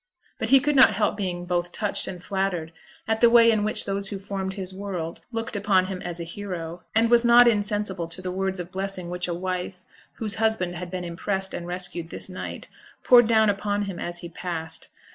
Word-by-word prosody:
But 220 - -2
he 270 +1 +8
could 295 +2 0
not 250 -6 +7
help 210 0 +1
being 180 -3 -3
both 175 0 -1
touched 210 +2 -1
and 180 -2 -7
flattered 185 -5 -2 0.3
at 220 0 0
the 235 - +7
way 230 -1 +7
in 215 -2 +1
which 215 - +1
those 200 0 -1
who 200 - -4
formed 190 -1 -4
his 190 -2 -4
'world' 185 -4 -5
looked 225 -1 -3
upon 200 -2 +2
him 185 -1 -5
as 175 -1 -3
a - - -3
hero; 175 -2 -6
and 230 +1 +3
was 240 0 +6
not 240 +1 +7
insensible 205 -5 0
to 165 +2 -6
the 185 0 -4
words 190 0 -2
of 175 0 -6
blessing 190 -2 -3
which 180 0 -3
a 175 - -2
wife, 180 0 -4 0.3
whose 215 -3 -2
husband 220 -6 +1
had 175 0 -6
been 180 0 -4
impressed 190 +3 -2
and 170 - -5
rescued 175 -2 -3
this - - -6
night, 185 - -7 0.4
poured 240 -2 +7
down 220 -1 +4
upon 205 0 0
him 195 -3 -5
as 175 0 -4
he 170 - -7
passed. 165 -2 -5
190 Hz, 215 wpm, -25 LUFS, 175-210 Hz, 0.4 s, he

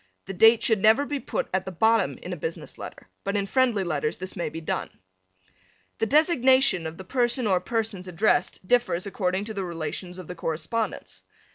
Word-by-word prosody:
The 195 - -6
date 225 +4 +6
should 220 -4 +3
never 220 +7 +5
be 290 -1 -3
put - - -3
at 190 0 +1
the 190 - -6
bottom 220 +6 +2
in - - -5
a - - -3
business 480 - -6
letter, - - -9 0.2
but 200 +1 -1
in 200 - 0
friendly 240 -2 +2
letters 150 -3 -2
this 185 +1 -7
may 175 -4 -2
be 160 +2 -7
done. 160 - -3 1.1
The 225 - +1
designation 265 - +4
of 160 +1 -8
the 190 - -8
person 240 +3 0
or 190 -3 +3
persons 215 -3 -3
addressed 185 0 0
differs 240 -7 +2
according 190 0 -1
to 220 - -5
the 195 -2 -3
relations 175 +1 -5
of 185 -3 -9
the 180 - -5
correspondents. 165 +7 -4
200 Hz, 190 wpm, -26 LUFS, 180-235 Hz, 1.1 s, date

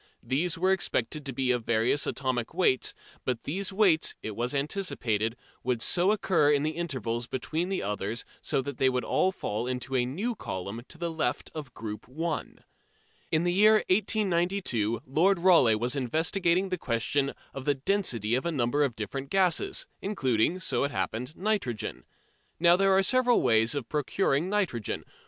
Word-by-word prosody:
These 165 +6 0
were 185 +3 +2
expected 150 -5 -1
to - - -2
be 130 0 0
of 125 -2 0
various 115 +5 +1
atomic 130 0 -2
weights, 150 -9 +2 0.3
but 125 -3 -2
these 190 +6 -2
weights, 190 -5 +3
it 110 - -5
was 120 +5 -1
anticipated, 125 - -1 0.3
would 125 -2 0
so 180 +3 +3
occur 185 -8 +2
in 145 -1 +2
the 155 - 0
intervals 125 -8 -3
between 160 +8 -3
the 195 - -2
others 105 +3 -3 0.2
that 135 -1 -1
they 130 - +4
would 125 -1 -1
all 190 - +2
fall 115 - -3
into 130 +1 -3
a 125 - +3
new 200 - -2
column 100 - -5
to 165 - -10
the 170 0 -3
left 160 -1 -2
of 150 -6 -8
"Group 105 -1 -7
1." 160 +5 -4 0.7
In 160 0 +2
the 175 0 +1
year 210 +3 +6 0.2
1892 180 - +1
Lord 175 +9 +3
Rayleigh 170 -11 +5
was 120 +4 0
investigating 170 - +1
the 185 -1 -2
question 135 +3 0 0.2
of 135 -1 -7
the 145 -1 +2
density 130 - 0
of 130 - +1
a - - 0
number 140 0 +1
of 130 -5 -1
different 135 +6 -5
gases, 195 - +1 0.2
including, 160 - +1
so 175 - 0
it 140 - 0
happened, 125 +1 -3
nitrogen. 190 - -2 0.5
Now 170 +1 +6
there 195 0 +3
are 195 - +4
several 250 +2 +3
ways 115 +1 +3
of 135 -5 -3
procuring 150 +2 0
nitrogen. 185 - -1
145 Hz, 170 wpm, -28 LUFS, 120-185 Hz, 0.7 s, year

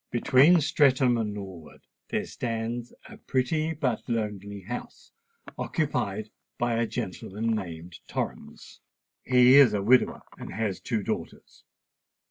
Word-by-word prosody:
"Between 140 +8 +5
Streatham 130 -4 +3
and 110 -3 -1
Norwood 95 -6 -9 0.3
there - - -1
stands 115 +1 -4 0.2
a - - -12
pretty 155 +5 -1
but 130 -7 -1
lonely 100 -3 -3
house, 120 +7 -8 0.5
occupied 110 -9 -2 0.3
by 120 -1 0
a 115 0 0
gentleman 110 0 -3
named 85 -4 -7
Torrens. - - -6 0.4
He 125 +1 +6
is 130 -7 +7
a 100 - -1
widower, 125 +4 +3 0.2
and - - -8
has 105 -4 -2
two 110 -4 -2
daughters. - - -6
115 Hz, 120 wpm, -27 LUFS, 105-130 Hz, 0.5 s, is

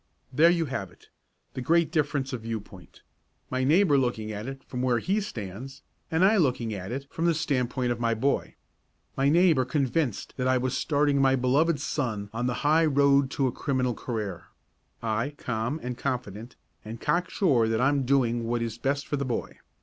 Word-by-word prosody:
There 160 +6 +6
you 170 -1 +2
have 120 -10 -4
it - - -22 0.4
the 130 - -5
great 170 +5 +2
difference 145 -4 -1
of 125 - -4
viewpoint: 105 -7 -8 0.5
my 130 0 0
neighbour 150 +1 +4
looking 115 -4 -2
at 105 +3 -5
it 135 0 -7
from 125 - -5
where 125 -2 +2
he 195 - 0
stands 125 - -7 0.3
and 165 +3 +3
I 215 +3 +4
looking 125 - +1
at 95 +1 -6
it 135 +2 -4
from 165 - -2
the 170 -1 +3
standpoint 130 -5 -1
of 120 - -2
my 115 -1 +1
boy. 135 +5 -1 0.6
My 135 +1 +2
neighbour 165 -4 +4
convinced 130 -1 -1
that 130 -1 0
I 130 0 +3
was 130 0 -1
starting 145 -2 +1
my 135 0 +4
beloved 140 +5 +2
son 120 -7 -3
on 120 +2 -1
the 125 - -3
highroad 140 -3 +4
to 135 0 0
a 130 - +1
criminal 130 -3 -1
career; 105 -7 -5 0.6
I 115 +6 -1
calm 120 +6 -2
and 125 0 -3
confident, 120 -2 -4 0.3
and 110 +2 -8
cocksure 155 - +1
that 110 0 0
I 130 +3 +4
am 140 -1 +1
doing 120 -3 +1
what 120 0 -1
is 115 0 -5
best 140 +3 -1
for 145 - -2
the 140 - -2
boy. 120 -2 -4
130 Hz, 190 wpm, -27 LUFS, 115-145 Hz, 0.6 s, There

